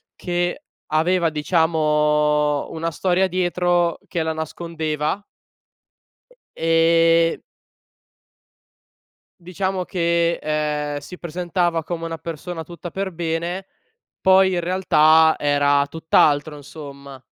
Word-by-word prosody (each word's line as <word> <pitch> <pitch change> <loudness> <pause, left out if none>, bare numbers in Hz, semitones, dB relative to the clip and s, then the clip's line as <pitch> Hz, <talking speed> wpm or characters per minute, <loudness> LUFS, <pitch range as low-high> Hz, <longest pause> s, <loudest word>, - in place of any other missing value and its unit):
che 175 +8 -2 0.2
aveva, 170 +2 +1
diciamo, 150 -2 +1
una 165 +1 -3
storia 185 +4 +1
dietro 175 -1 0
che 170 - -2
la 160 - -2
nascondeva 160 +2 -3 1.3
ehm 165 0 +3 2.0
diciamo 185 +1 -3
che, 170 -2 0
ehm, 150 -1 -2
si 180 +5 -11
presentava 175 0 -1
come 165 +1 -5
una 165 0 -5
persona 165 +1 -6
tutta 175 +1 -9
per 195 0 -3
bene 170 +3 -3 0.6
poi 190 0 +5
in 175 - 0
realtà 160 -3 +4
era 145 -1 +2
tutt’altro, 150 -2 +2
insomma. 140 -2 -11
165 Hz, 95 wpm, -21 LUFS, 150-175 Hz, 2.0 s, poi